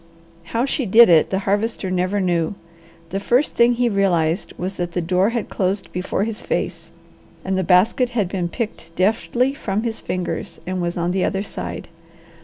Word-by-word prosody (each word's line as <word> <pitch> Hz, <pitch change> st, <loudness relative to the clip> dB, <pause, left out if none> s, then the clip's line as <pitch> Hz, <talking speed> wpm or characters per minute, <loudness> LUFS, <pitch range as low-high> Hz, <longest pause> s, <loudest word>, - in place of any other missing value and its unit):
How 230 Hz, +7 st, 0 dB
she 270 Hz, -3 st, -1 dB
did 225 Hz, +1 st, +7 dB
it 160 Hz, -2 st, +5 dB
the 190 Hz, -, 0 dB
Harvester 205 Hz, -1 st, 0 dB
never 185 Hz, +2 st, 0 dB
knew. 175 Hz, -1 st, 0 dB, 0.5 s
The 195 Hz, -, -2 dB
first 245 Hz, +8 st, +2 dB
thing 235 Hz, +1 st, +4 dB
he 240 Hz, 0 st, +1 dB
realized 185 Hz, -5 st, +1 dB
was 185 Hz, +2 st, -4 dB
that 175 Hz, -1 st, -3 dB
the -, -, 0 dB
door 180 Hz, +4 st, +2 dB
had 235 Hz, -2 st, -2 dB
closed 190 Hz, +1 st, -2 dB
before 185 Hz, +2 st, -1 dB
his 225 Hz, +1 st, -3 dB
face, -, -, -3 dB, 0.6 s
and 190 Hz, 0 st, 0 dB
the 190 Hz, -, +1 dB
basket 195 Hz, +8 st, +3 dB
had 205 Hz, -4 st, +2 dB
been 180 Hz, -2 st, -2 dB
picked 170 Hz, -7 st, -5 dB
deftly 230 Hz, +6 st, +1 dB
from 215 Hz, -7 st, -2 dB
his 230 Hz, -2 st, -3 dB
fingers 180 Hz, -1 st, -4 dB
and 185 Hz, 0 st, -2 dB
was 175 Hz, 0 st, -2 dB
on 175 Hz, 0 st, 0 dB
the 185 Hz, 0 st, 0 dB
other 195 Hz, +1 st, 0 dB
side. -, -, -6 dB
195 Hz, 185 wpm, -21 LUFS, 180-225 Hz, 0.6 s, did